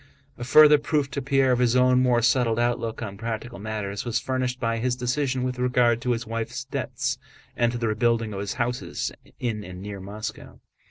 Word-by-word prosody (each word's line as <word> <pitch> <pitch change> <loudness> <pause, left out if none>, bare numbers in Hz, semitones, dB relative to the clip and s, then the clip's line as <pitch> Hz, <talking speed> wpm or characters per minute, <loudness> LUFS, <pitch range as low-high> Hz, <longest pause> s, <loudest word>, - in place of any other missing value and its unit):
A 120 - -7
further 150 +4 +7
proof 145 -2 0
to 140 - -3
Pierre 135 -1 +2
of 125 - +2
his 125 -1 +3
own 125 0 +5
more 120 -2 +3
settled 120 -1 +3
outlook 120 -1 -1
on 100 -3 -6
practical 115 +1 -5
matters 105 -1 -4
was 120 -1 -1
furnished 130 -1 -2
by 115 -2 -1
his 125 +1 0
decision 130 +1 -1
with 125 0 -3
regard 125 -2 +2
to 125 0 +1
his 115 0 -3
wife's 115 +3 -4
debts - - -3 0.4
and 120 -1 +2
to 120 - -3
the 115 -1 -1
rebuilding 115 0 +1
of 95 - -4
his 100 0 -3
houses 125 0 -2 0.3
in 110 -4 -2
and 90 -2 -9
near 100 +1 -6
Moscow. 105 +3 -7
120 Hz, 200 wpm, -25 LUFS, 110-125 Hz, 0.4 s, further